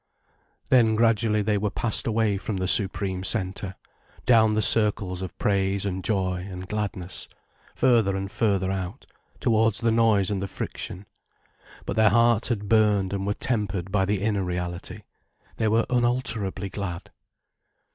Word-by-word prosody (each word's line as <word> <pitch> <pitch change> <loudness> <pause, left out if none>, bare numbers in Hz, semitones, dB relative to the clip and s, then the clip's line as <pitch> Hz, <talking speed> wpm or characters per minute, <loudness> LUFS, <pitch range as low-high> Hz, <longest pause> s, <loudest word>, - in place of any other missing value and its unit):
Then 115 -4 +5
gradually 110 -1 +2
they 105 0 +1
were 105 +1 -1
passed 110 +3 0
away 110 -3 +1
from 100 0 -4
the 95 0 -1
supreme 95 -1 +1
centre, 95 0 -2 0.5
down 110 -3 +4
the 110 - +2
circles 100 -4 +2
of 95 -2 -7
praise 100 0 0
and 95 -1 -3
joy 95 -3 -1
and 90 0 -7
gladness, 100 -4 -3 0.5
further 115 -7 +3
and 95 0 -5
further 100 -4 0
out, 95 +5 -5 0.3
towards 110 -3 +2
the 115 -1 +1
noise 110 -4 +3
and 100 -2 -2
the 100 - -3
friction. 95 0 -6 0.8
But - - -4
their 110 -1 +5
hearts 115 +1 +3
had 105 -4 -2
burned 105 -3 +2
and 100 0 -3
were 105 - 0
tempered 100 -6 -2
by 95 -1 +2
the 100 0 -1
inner 105 -3 0
reality, 90 0 -5 0.5
they 110 - +1
were 115 +2 +2
unalterably 120 -5 -1
glad. 90 -3 -6
100 Hz, 150 wpm, -25 LUFS, 95-110 Hz, 0.8 s, Then